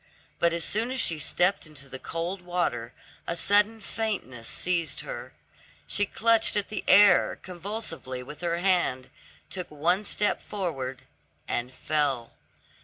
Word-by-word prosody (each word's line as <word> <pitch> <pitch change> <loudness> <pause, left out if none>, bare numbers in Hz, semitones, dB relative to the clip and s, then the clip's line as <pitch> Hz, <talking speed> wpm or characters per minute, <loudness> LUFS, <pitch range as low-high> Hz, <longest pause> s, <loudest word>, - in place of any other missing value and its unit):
But 170 - +4
as 170 0 -1
soon 225 +4 0
as 260 0 -2
she 165 -8 +2
stepped 180 +2 +1
into 145 -3 -8
the 130 -1 -8
cold 170 +6 -4
water, 175 -10 -1 0.4
a 170 - -1
sudden 205 +4 +4
faintness 190 - -4
seized 175 -3 0
her; - - -7 0.5
she 205 -1 +1
clutched 225 +1 +3
at 205 -1 +1
the 215 - -4
air 205 -2 +6
convulsively 180 - -5
with 150 +5 -10
her 170 -1 0
hand, 175 -8 +1 0.4
took 180 -2 -5
one 170 +7 +1
step 210 0 0
forward, 135 -10 -4 0.4
and 120 +1 -2
fell. 135 -4 0
175 Hz, 140 wpm, -27 LUFS, 145-205 Hz, 0.5 s, air